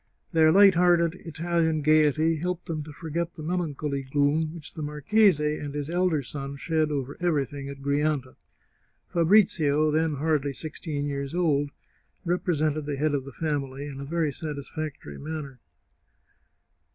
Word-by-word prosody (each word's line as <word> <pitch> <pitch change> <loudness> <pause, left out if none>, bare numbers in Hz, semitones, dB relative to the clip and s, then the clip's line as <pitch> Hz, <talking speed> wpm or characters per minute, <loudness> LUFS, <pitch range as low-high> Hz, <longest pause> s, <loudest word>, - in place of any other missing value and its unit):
Their 160 -2 +5
light 195 +2 +7
hearted 170 -1 +4
Italian 165 -1 0
gaiety 155 +1 +4
helped 180 +2 -3
them 160 -2 -3
to 155 - -9
forget 165 +2 -4
the 155 - -8
melancholy 150 -4 -2
gloom 145 +3 +1
which 155 -3 -8
the 155 - -7
marchese 150 +1 +2
and 145 -1 -6
his 145 +2 -3
elder 175 -4 +1
son 140 +1 -6
shed 155 +1 0
over 140 -2 -3
everything 145 -5 -1
at 140 0 -9
Grianta. 140 -2 0 0.8
Fabrizio, 160 -5 +4
then 160 0 +1
hardly 145 -1 0
sixteen 150 0 -4
years 140 +1 -3
old, 145 -5 +2 0.6
represented 155 -4 0
the 145 - -1
head 150 +2 0
of 135 -2 -1
the 140 - -8
family 140 -2 -3
in 140 -2 -7
a - - -5
very 160 0 0
satisfactory 150 - -6
manner. 150 -4 -6
155 Hz, 145 wpm, -26 LUFS, 145-165 Hz, 0.8 s, light